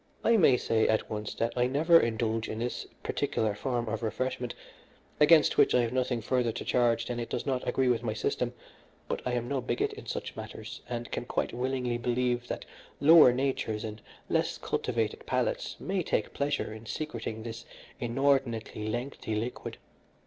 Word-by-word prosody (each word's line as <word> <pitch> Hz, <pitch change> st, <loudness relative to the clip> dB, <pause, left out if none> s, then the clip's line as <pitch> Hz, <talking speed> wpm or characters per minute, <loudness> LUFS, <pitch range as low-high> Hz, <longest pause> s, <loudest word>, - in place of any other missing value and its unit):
"I 230 Hz, -, +5 dB
may 150 Hz, -, +6 dB
say 110 Hz, -2 st, +2 dB
at 110 Hz, -, +1 dB
once 105 Hz, -1 st, -4 dB
that 115 Hz, +1 st, -1 dB
I 125 Hz, 0 st, +3 dB
never 160 Hz, +6 st, +5 dB
indulge 115 Hz, -2 st, 0 dB
in 110 Hz, -, -4 dB
this 120 Hz, +2 st, -3 dB, 0.2 s
particular 110 Hz, -2 st, 0 dB
form 120 Hz, +1 st, -2 dB
of 110 Hz, +1 st, -2 dB
refreshment, 125 Hz, +2 st, -2 dB, 0.6 s
against 150 Hz, +1 st, +6 dB
which -, -, +5 dB
I 125 Hz, -, +5 dB
have 120 Hz, 0 st, -1 dB
nothing 125 Hz, -2 st, 0 dB
further 120 Hz, +1 st, +1 dB
to -, -, -5 dB
charge 115 Hz, -2 st, +2 dB
than 120 Hz, -1 st, -3 dB
it 120 Hz, -, -4 dB
does -, -, -3 dB
not 130 Hz, -2 st, -1 dB
agree 130 Hz, -1 st, +2 dB
with 120 Hz, -2 st, +2 dB
my 110 Hz, -3 st, -2 dB
system, 105 Hz, -, -1 dB, 0.6 s
but -, -, -2 dB
I 125 Hz, -, 0 dB
am 120 Hz, -1 st, -1 dB
no 135 Hz, 0 st, -1 dB
bigot 120 Hz, -1 st, -1 dB
in -, -, -10 dB
such -, -, -4 dB
matters, -, -, -8 dB
and 120 Hz, -1 st, -4 dB
can -, -, -3 dB
quite -, -, -1 dB
willingly 125 Hz, -1 st, -1 dB
believe 120 Hz, 0 st, 0 dB
that -, -, -4 dB, 0.3 s
lower 155 Hz, -2 st, +8 dB
natures 125 Hz, -4 st, -1 dB
and 110 Hz, -1 st, -6 dB, 0.3 s
less -, -, 0 dB
cultivated -, -, -2 dB
palates -, -, -1 dB
may 190 Hz, 0 st, -1 dB
take -, -, -1 dB
pleasure 140 Hz, -5 st, -1 dB
in 110 Hz, +1 st, -10 dB
secreting 115 Hz, -7 st, -4 dB
this 115 Hz, 0 st, -6 dB, 0.4 s
inordinately 120 Hz, -4 st, 0 dB
lengthy 120 Hz, -1 st, -3 dB
liquid. 115 Hz, +4 st, -4 dB
120 Hz, 180 wpm, -29 LUFS, 115-130 Hz, 0.6 s, lower